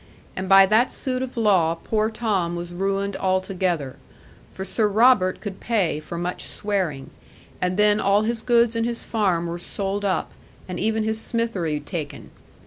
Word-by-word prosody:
And 185 0 -4
by 195 0 +8
that 220 +5 +3
suit 255 -2 -1
of 260 -1 -6
law 185 -7 +3
poor 215 +5 -1
Tom 205 -7 -1
was 175 0 -6
ruined 195 +2 -1
altogether, 185 -6 -1 0.5
for 190 - -6
Sir 215 +3 +1
Robert 210 -3 +4
could 200 -3 -6
pay 195 -10 0
for 170 +2 -7
much 175 +1 -4
swearing; 185 -10 -3 0.5
and 180 +1 0
then 210 0 +4
all 200 +1 +3
his 225 +1 -2
goods 235 -1 +3
and 230 - 0
his 235 0 -3
farm 190 -7 0
were 170 +1 -4
sold 195 +3 -3
up, 195 -2 -1 0.4
and 180 -1 -5
even 220 0 0
his 220 0 0
smithery 195 -12 0
taken. 150 -1 -7
195 Hz, 165 wpm, -23 LUFS, 180-220 Hz, 0.5 s, by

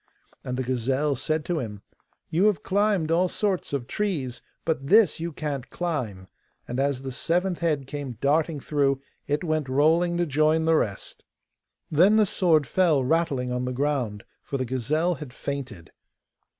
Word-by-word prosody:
And 125 0 -3
the 130 - -1
gazelle 130 +4 0
said 155 +4 -1
to 175 -3 -1
him, 105 -6 -6 0.5
'You 175 +5 +3
have 205 -8 +2
climbed 200 -5 +1
all 175 +3 +3
sorts 195 0 -1
of 140 -4 -2
trees, 140 - -2 0.2
but 155 -4 -1
this 205 -3 +5
you 170 +1 -3
can't 145 -4 -4
climb,' 120 - -3 0.4
and 125 - -3
as 135 -1 0
the 135 - -4
seventh 175 +6 0
head 155 -5 0
came 140 -1 -5
darting 150 +2 +1
through 140 -1 +1 0.3
it 145 +3 0
went 155 -4 -1
rolling 165 +6 +3
to 175 - +1
join 155 +2 +2
the 165 - +4
rest. 100 -10 -2 0.7
Then 180 +8 +5
the 215 -1 +5
sword 165 -6 +2
fell 165 -4 +2
rattling 140 -4 0
on 125 0 -1
the 125 - -2
ground, 125 -6 -1 0.2
for 140 - -4
the 130 - -1
gazelle 145 +8 0
had 150 -4 -8
fainted. 130 - -6
150 Hz, 165 wpm, -26 LUFS, 130-170 Hz, 0.7 s, this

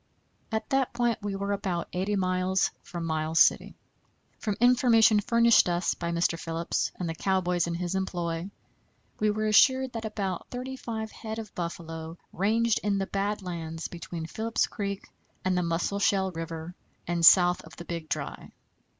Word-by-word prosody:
At 220 0 -2
that 270 -1 +1
point 235 -2 +1
we 200 -1 -3
were 200 +1 -2
about 190 -4 -2
80 190 +3 0
miles 185 0 +1
from 170 -2 -6
Miles 160 0 0
City. - - +4 0.6
From 210 -2 -2
information 235 -3 +5
furnished 235 -1 +4
us 175 +1 +1
by 170 - -4
Mr. 170 0 0
Phillips 165 0 -2
and 180 - -4
the 165 - -2
cowboys 180 -1 0
in 170 - -2
his 175 +1 -3
employ, 175 -2 -2 0.7
we 215 - +2
were 215 +1 -1
assured 260 +4 +4
that 230 -1 -4
about 200 -4 -3
thirty 255 +1 -5
five 220 -3 -5
head 220 0 -6
of 220 -3 -7
buffalo 165 -1 -6 0.2
ranged 225 +4 +2
in 205 -1 0
the 195 - 0
bad 200 +1 -2
lands 165 -2 -5
between 170 -1 -6
Phillips 225 +7 -1
Creek 200 -1 -5 0.4
and 185 0 +2
the 180 - +2
Musselshell 190 +3 +1
River 165 0 -6 0.3
and 170 -1 -1
south 180 +1 +7
of - - -13
the 170 - -9
Big 165 -2 -5
Dry. - - -4
190 Hz, 165 wpm, -28 LUFS, 170-215 Hz, 0.7 s, south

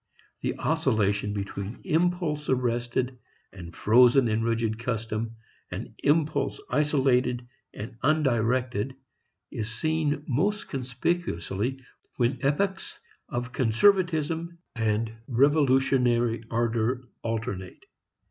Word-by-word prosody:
The - - -1
oscillation 105 -1 +1
between 100 +1 -5
impulse 170 -3 0
arrested 125 0 0 0.3
and 85 -3 -10
frozen 120 +3 +5
in 110 0 +1
rigid 115 -1 0
custom 115 -1 -3 0.3
and - - -6
impulse 155 - +1
isolated 130 -4 +2 0.2
and 115 +2 -8
undirected 130 -4 +1 0.6
is 110 0 -4
seen 150 +4 -1
most 195 - 0
conspicuously 125 - -2 0.3
when 120 0 +1
epochs 190 +8 -1 0.3
of 125 +1 -4
conservatism 165 - +2 0.2
and 110 0 0
revolutionary 130 -4 +3
ardor 120 +2 0 0.2
alternate. 110 -5 -4
125 Hz, 90 wpm, -27 LUFS, 115-145 Hz, 0.6 s, frozen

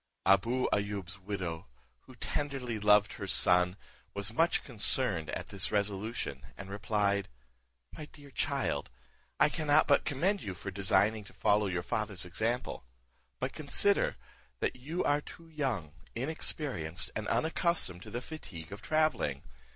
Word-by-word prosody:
Abou 115 +6 +4
Ayoub's 100 -2 -2
widow, 90 -4 -4 0.4
who 130 - -13
tenderly 130 -3 -2
loved 105 0 +5
her 100 - -6
son, 90 0 +4 0.4
was 100 +2 +1
much 165 +8 +3
concerned 105 - -1
at - - -4
this 100 -2 -1
resolution, 100 - -1 0.2
and 95 0 -8
replied, 100 -1 0 0.7
"My 155 - -7
dear 145 -1 -15
child, - - -1 0.5
I - - +7
cannot 155 -1 +3
but 140 - +5
commend 175 +8 +1
you 95 -2 -5
for 100 +2 -6
designing 100 +2 +2
to - - -14
follow 105 0 +3
your 90 -2 -1
father's 105 -3 -2
example; 110 +7 -1 0.6
but - - -2
consider, - - +3 0.4
that - - 0
you 150 +8 -3
are 145 +1 +2
too 165 +2 -12
young, 130 - -2 0.2
inexperienced, 130 - -1
and - - -3
unaccustomed 160 - +2
to - - -9
the 120 - -4
fatigue 95 - -9
of 100 +2 -7
travelling. 155 - +1
105 Hz, 140 wpm, -32 LUFS, 95-140 Hz, 0.7 s, I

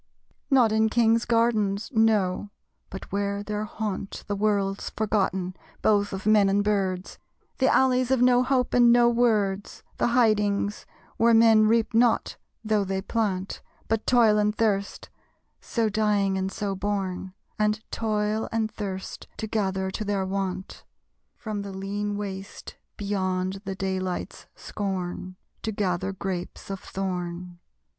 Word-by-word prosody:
Not 250 -6 +5
in 220 0 +3
kings' 230 0 +3
gardens. 220 -4 +1
No; 210 -4 +2 0.4
but 190 - -9
where 200 +1 -1
there 210 0 -3
haunt 210 -2 -5
The 205 - -2
world's 200 -1 0
forgotten, 190 -4 -1 0.3
both 205 -1 +3
of 190 +1 -6
men 210 -2 +5
and 200 +1 +2
birds; 195 -3 -1 0.4
The 265 0 +4
alleys 255 -1 +3
of 265 -1 +3
no 250 0 +5
hope 255 -1 +1
and 245 -1 +6
of - - +7
no 240 0 +5
words, 215 -5 0 0.2
The - - +3
hidings 210 -4 +1 0.3
where 230 0 +5
men 225 -1 +6
reap 230 +1 +2
not, 235 0 +2 0.3
though 215 -2 +1
they 190 0 -3
plant; 195 -4 -2 0.3
But 225 0 -1
toil 225 -4 +5
and 210 0 +1
thirst 200 -3 -1 0.5
so 230 -2 -1
dying 210 -2 +1
and 190 0 -2
so 200 -1 -3
born; 190 -1 -3 0.3
And 210 0 +2
toil 215 0 -1
and 220 -1 -1
thirst 190 -2 -6
to - - -3
gather 190 -3 -1
to 215 - -4
their 200 -2 -1
want, 190 -1 -4 0.5
From 215 -3 -5
the 200 0 -6
lean 205 +2 -3
waste, 195 -1 -7 0.2
beyond 190 -1 -2
the 195 0 -3
daylight's 190 -1 -3
scorn, 185 -2 -4 0.3
To 220 - -2
gather 190 -2 -1
grapes 190 0 -5
of 195 - -4
thorn! 180 -2 -5
205 Hz, 140 wpm, -26 LUFS, 190-220 Hz, 0.5 s, of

